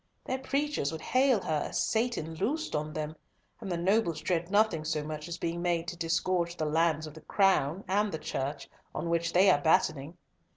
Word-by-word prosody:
Their 260 Hz, -, -2 dB
preachers 275 Hz, -, -1 dB
would 160 Hz, -, -6 dB
hail 255 Hz, -3 st, +3 dB
her 155 Hz, -2 st, -1 dB
as -, -, -2 dB
Satan 220 Hz, -8 st, 0 dB
loosed 265 Hz, -, -2 dB
on 150 Hz, +1 st, -2 dB
them, 155 Hz, -1 st, -4 dB, 0.4 s
and 200 Hz, -4 st, -6 dB
the 175 Hz, -, 0 dB
nobles 175 Hz, -2 st, +1 dB
dread 175 Hz, -1 st, -1 dB
nothing 205 Hz, -6 st, +2 dB
so 155 Hz, -1 st, -1 dB
much 155 Hz, +1 st, -6 dB
as 170 Hz, -, -5 dB
being 170 Hz, +1 st, -3 dB
made 170 Hz, -1 st, 0 dB
to 175 Hz, -, -6 dB
disgorge 170 Hz, +1 st, 0 dB
the 155 Hz, -, -1 dB
lands 155 Hz, 0 st, +1 dB
of 155 Hz, -, -9 dB
the 160 Hz, -, -12 dB
Crown 190 Hz, -3 st, +2 dB
and 205 Hz, +2 st, +1 dB
the 160 Hz, -, -3 dB
Church, 140 Hz, -2 st, -4 dB, 0.3 s
on 170 Hz, -, -2 dB
which 170 Hz, 0 st, +1 dB
they 185 Hz, +3 st, +5 dB
are 145 Hz, -, +2 dB
battening. 155 Hz, 0 st, +1 dB
170 Hz, 200 wpm, -30 LUFS, 155-195 Hz, 0.4 s, they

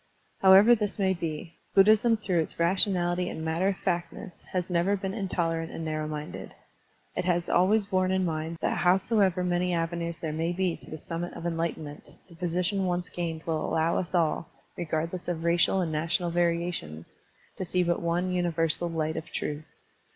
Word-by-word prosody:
However 195 Hz, +5 st, +8 dB
this 210 Hz, -3 st, -1 dB
may 190 Hz, -2 st, +2 dB
be. 165 Hz, -1 st, -5 dB, 0.2 s
Buddhism 215 Hz, +3 st, +5 dB
through 190 Hz, -5 st, 0 dB
its 160 Hz, -, -1 dB
rationality 180 Hz, 0 st, +2 dB
and 160 Hz, -, -5 dB
matter 165 Hz, +4 st, +1 dB
of 195 Hz, -2 st, 0 dB
fact 175 Hz, -2 st, -1 dB
ness 185 Hz, -6 st, -10 dB
has 180 Hz, -1 st, -1 dB
never 180 Hz, +3 st, +1 dB
been 190 Hz, 0 st, -4 dB
intolerant 170 Hz, -5 st, -2 dB
and 165 Hz, -, -5 dB
narrow 155 Hz, -1 st, -2 dB
minded. 150 Hz, 0 st, -6 dB, 0.6 s
It 180 Hz, -, -1 dB
has 175 Hz, -1 st, +1 dB
always 200 Hz, +4 st, +3 dB
borne 185 Hz, -1 st, +1 dB
in 190 Hz, 0 st, +1 dB
mind 160 Hz, 0 st, -3 dB
that -, -, 0 dB
howsoever 190 Hz, 0 st, +3 dB
many 180 Hz, 0 st, +1 dB
avenues 170 Hz, 0 st, -2 dB
there 155 Hz, -2 st, -4 dB
may 165 Hz, +2 st, -1 dB
be 180 Hz, -1 st, 0 dB
to -, -, -14 dB
the 155 Hz, -, -6 dB
summit 170 Hz, +3 st, -5 dB
of -, -, -8 dB
enlight 165 Hz, -1 st, -1 dB
enment, 150 Hz, -1 st, -9 dB, 0.2 s
the 175 Hz, -, -16 dB
position 180 Hz, +3 st, -1 dB
once 180 Hz, 0 st, -1 dB
gained 165 Hz, -2 st, -4 dB
will 160 Hz, -2 st, -1 dB
allow 160 Hz, +1 st, +1 dB
us 180 Hz, 0 st, -4 dB
all, 165 Hz, -1 st, +1 dB, 0.3 s
regardless 165 Hz, +1 st, -3 dB
of 165 Hz, -2 st, -2 dB
racial 170 Hz, +3 st, +3 dB
and 165 Hz, -3 st, -1 dB
national 165 Hz, +3 st, 0 dB
variations, 170 Hz, -, -2 dB, 0.4 s
to -, -, -2 dB
see 180 Hz, 0 st, +1 dB
but 175 Hz, -1 st, 0 dB
one 175 Hz, +2 st, 0 dB
universal 170 Hz, -1 st, 0 dB
light 160 Hz, -1 st, -2 dB
of 160 Hz, -, -6 dB
truth. 150 Hz, +1 st, -4 dB
175 Hz, 180 wpm, -28 LUFS, 165-185 Hz, 0.6 s, However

